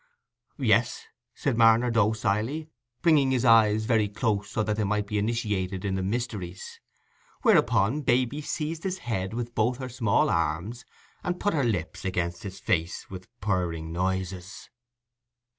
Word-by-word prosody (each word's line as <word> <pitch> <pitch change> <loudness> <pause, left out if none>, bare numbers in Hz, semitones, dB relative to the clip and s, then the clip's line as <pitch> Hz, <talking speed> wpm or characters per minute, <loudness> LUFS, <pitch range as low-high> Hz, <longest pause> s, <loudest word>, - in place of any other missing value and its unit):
"Yes," 455 - +2 0.3
said 135 -7 -1
Marner, 115 +1 +5
docilely, 110 +7 0 0.3
bringing 150 -5 +4
his 130 -1 +1
eyes 110 -2 +5
very 110 -3 +2
close, 105 -2 -2
that 105 -1 0
they 110 - -1
might 105 0 0
be 105 0 -1
initiated 100 -4 -2
in 100 - -1
the 95 - -1
mysteries; 100 -3 -4 0.6
whereupon 120 +4 +3
Baby 130 +2 +1
seized 155 +2 -3
his 190 -1 -2
head 100 -3 -2
with 120 0 -4
both 120 +3 +1
her 130 -1 -6
small 120 -4 +2
arms, 85 +10 -1 0.4
and 180 -2 -2
put 205 - 0
her 145 -4 +1
lips 95 -9 -2
against 85 -2 -2
his 95 -2 -7
face 85 +1 -2
with 95 0 -8
purring 85 -5 -1
noises. 95 +1 -3
110 Hz, 140 wpm, -27 LUFS, 95-125 Hz, 0.6 s, Marner